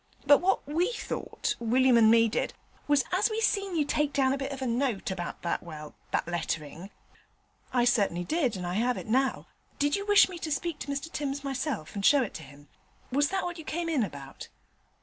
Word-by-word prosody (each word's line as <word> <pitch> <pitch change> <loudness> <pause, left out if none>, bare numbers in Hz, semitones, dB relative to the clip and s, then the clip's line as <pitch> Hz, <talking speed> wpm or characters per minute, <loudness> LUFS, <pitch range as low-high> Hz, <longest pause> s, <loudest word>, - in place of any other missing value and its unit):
But 285 - +7
what 380 +2 +1
we 340 +9 +1
thought, - - -3
William 250 +2 +3
and 225 -2 +6
me 230 0 +6
did, 220 - -2 0.3
was 290 -2 +4
as 375 +5 +2
we 435 0 -2
seen 395 -4 0
you 305 -3 +2
take 295 0 0
down 265 -1 +2
a - - -1
bit 275 0 -3
of 275 - -5
a 265 - -3
note 235 -5 -1
about 175 -2 -5
that 170 - -1
well, 155 -3 -9 0.2
that - - 0
letterin' 170 +1 -4 0.4
' - - -38
'I 245 -1 +3
certainly 200 -7 +2
did 270 - 0
that, - - -4
and 180 - -5
I 175 - -3
have 240 +5 +1
it - - -6
now. 260 +4 +1 0.3
Did 290 +1 +2
you 400 +1 -4
wish 410 0 +7
me 365 -2 -8
to 315 - -4
speak 305 +2 -2
to - - -6
Mr 280 +3 -4
Timms 280 -1 -3
myself, 270 - -3
and 200 - -4
show 280 +5 +5
it 220 - -6
to - - -7
him? 145 0 -14 0.4
Was 285 +3 +2
that 385 0 -1
what 350 -1 -4
you - - -7
came 335 +2 -3
in 305 -6 +1
about?' 140 -8 -8
270 Hz, 230 wpm, -28 LUFS, 205-310 Hz, 0.4 s, But